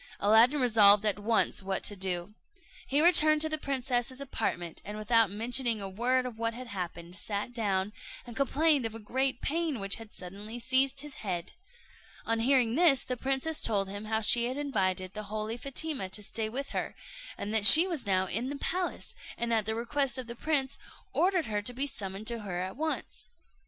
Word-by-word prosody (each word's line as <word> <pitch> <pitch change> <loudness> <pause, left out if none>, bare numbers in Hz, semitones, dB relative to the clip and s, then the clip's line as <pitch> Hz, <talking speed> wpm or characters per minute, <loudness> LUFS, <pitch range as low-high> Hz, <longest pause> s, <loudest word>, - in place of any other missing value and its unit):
Aladdin 225 +8 +5
resolved 215 -4 +5
at 205 -1 +1
once 220 0 +1
what 190 0 -3
to 205 - -2
do. 185 0 -3 0.5
He 285 +2 +3
returned 310 -2 +6
to 315 - 0
the 310 0 -2
princess's 260 -2 -2
apartment, 175 -11 -4
and 210 +1 -7
without 225 0 +3
mentioning 230 +2 0
a 195 - -5
word 245 +6 0
of 235 -3 -7
what 230 0 -2
had 255 +1 -8
happened, 175 -5 -6
sat 205 +4 -4
down, 205 -3 -1 0.3
and 240 -2 -10
complained 280 0 +2
of 225 - -10
a - - -7
great 260 +4 0
pain 320 -3 -1
which 195 0 -3
had 225 -2 -12
suddenly 200 +5 -7
seized 265 +3 +2
his 295 -2 -10
head. 180 -4 -4 0.7
On 230 0 0
hearing 245 -1 +2
this, 300 -3 +4
the 250 - -3
princess 270 +5 -1
told 200 -3 +1
him 205 +2 -6
how 220 +1 0
she 235 +2 +5
had 255 +3 -3
invited 190 -9 -1
the 215 - -5
holy 215 +1 -3
Fatima 275 -4 -3
to 210 +2 -1
stay 215 +2 -4
with 275 +5 -5
her, - - -4 0.4
and 210 - -5
that 215 -2 +5
she 325 +3 +10
was 330 - -4
now 190 -1 +2
in 230 +7 -2
the 285 - -5
palace; 360 +4 -3 0.2
and 235 0 -2
at 220 -2 +1
the 220 - 0
request 270 +3 -1
of 255 - -4
the 235 0 -8
prince, 275 -1 -1 0.3
ordered 365 -2 +2
her 210 -1 -2
to 245 +4 -3
be 270 +3 +1
summoned 195 -5 -5
to 235 0 -2
her 190 -4 -5
at 185 +1 -4
once. 315 +3 -4
230 Hz, 200 wpm, -29 LUFS, 205-270 Hz, 0.7 s, she